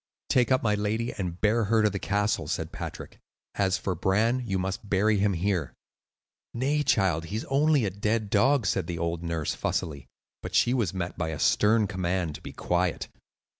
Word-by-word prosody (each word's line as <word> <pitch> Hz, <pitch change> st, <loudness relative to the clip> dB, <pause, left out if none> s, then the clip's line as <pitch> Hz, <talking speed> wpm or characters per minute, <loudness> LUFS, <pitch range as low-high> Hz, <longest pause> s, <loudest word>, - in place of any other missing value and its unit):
"Take 125 Hz, 0 st, +3 dB
up 130 Hz, -, +3 dB
my 105 Hz, -2 st, +2 dB
lady 110 Hz, +3 st, -1 dB
and 90 Hz, -3 st, -4 dB
bear 110 Hz, +1 st, +2 dB
her 110 Hz, +1 st, +3 dB
to 105 Hz, -, +4 dB
the 100 Hz, -, -3 dB
castle," 105 Hz, +1 st, 0 dB
said -, -, -3 dB
Patrick; -, -, -8 dB, 0.3 s
"as 95 Hz, -2 st, +1 dB
for 95 Hz, -, -2 dB
Bran, 110 Hz, +8 st, +1 dB
you 95 Hz, -2 st, 0 dB
must 95 Hz, +2 st, -4 dB
bury 105 Hz, +2 st, +2 dB
him 100 Hz, 0 st, +2 dB
here." 90 Hz, -4 st, -1 dB, 0.8 s
"Nay, 140 Hz, +5 st, +1 dB
child, 95 Hz, -, +2 dB
he 100 Hz, -, -6 dB
is 110 Hz, -, -3 dB
only 145 Hz, -2 st, +3 dB
a 95 Hz, -, -1 dB
dead 105 Hz, +2 st, -1 dB
dog," 125 Hz, +3 st, +3 dB
said 90 Hz, -1 st, 0 dB
the 85 Hz, -, -4 dB
old 85 Hz, 0 st, -2 dB
nurse, 85 Hz, -3 st, -2 dB
fussily. 70 Hz, -5 st, -3 dB, 0.3 s
But -, -, -6 dB
she 120 Hz, -, +4 dB
was 115 Hz, -9 st, 0 dB
met 90 Hz, -2 st, -5 dB
by 80 Hz, -2 st, -1 dB
a 80 Hz, -, -4 dB
stern 105 Hz, +6 st, +3 dB
command 90 Hz, -4 st, -2 dB
to -, -, -9 dB
be -, -, -8 dB
quiet. 90 Hz, 0 st, -1 dB
100 Hz, 195 wpm, -27 LUFS, 90-110 Hz, 0.8 s, to